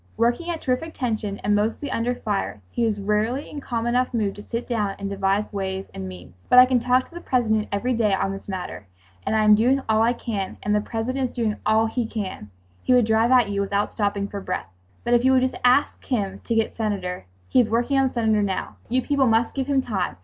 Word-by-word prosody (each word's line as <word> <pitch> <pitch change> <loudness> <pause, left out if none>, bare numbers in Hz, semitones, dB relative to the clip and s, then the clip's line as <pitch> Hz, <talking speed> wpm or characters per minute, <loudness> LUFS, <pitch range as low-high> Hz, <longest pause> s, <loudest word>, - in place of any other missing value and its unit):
Working 240 +9 +1
at 335 -2 -3
terrific 285 +5 -1
tension 220 -5 -2
and 210 - +2
mostly 220 +7 0
under 240 +2 0
fire, 205 - -3
he 235 - +1
was 210 -2 -1
rarely 210 +7 0
in 290 - -7
calm 235 -3 -3
enough 250 +1 +1
mood 205 -4 0
to 205 - -10
sit 230 +3 -5
down 210 -5 -1
and 200 - -4
devise 200 +2 0
ways 190 -1 -4
and 95 - -6
means. 90 0 -13
"But 250 - +5
I 250 - +11
talk 255 0 +2
to - - -20
the 345 - -7
President 220 -6 +1
every 240 +6 0
day 225 -3 +2
on 195 0 0
this 195 0 -8
matter"—and—"I 95 - -4
am 215 0 +7
doing 245 +6 +4
all 220 0 +3
I 235 +2 +3
can"—and—"The 210 -2 -2
President 250 +4 -2
is - - -18
doing 225 -3 0
all 220 +1 +4
he 225 +1 -2
can"—he 100 - -6
would 245 -2 +5
drive 220 +1 +3
at 250 -5 +5
you—without 200 0 0
stopping 200 -2 -1
for 200 0 -6
breath. 95 - -4 0.3
"But 240 - +1
if 240 0 +4
you 260 +1 +5
will 260 - +5
just 260 0 -1
ask 250 +3 +3
him 200 -6 -2
to 230 - -1
get 225 -1 0
Senator 190 - -3
——" 90 -1 -34
"He - - +4
is 225 - -1
working 240 +5 +1
on 270 - +3
the - - -6
Senator 220 -3 +2
now. 195 -2 -3
You 255 +2 +1
people 280 -2 +2
must 225 +1 +2
give 270 -1 -2
him 275 -2 +2
time. 205 - -2
220 Hz, 225 wpm, -23 LUFS, 200-245 Hz, 0.3 s, I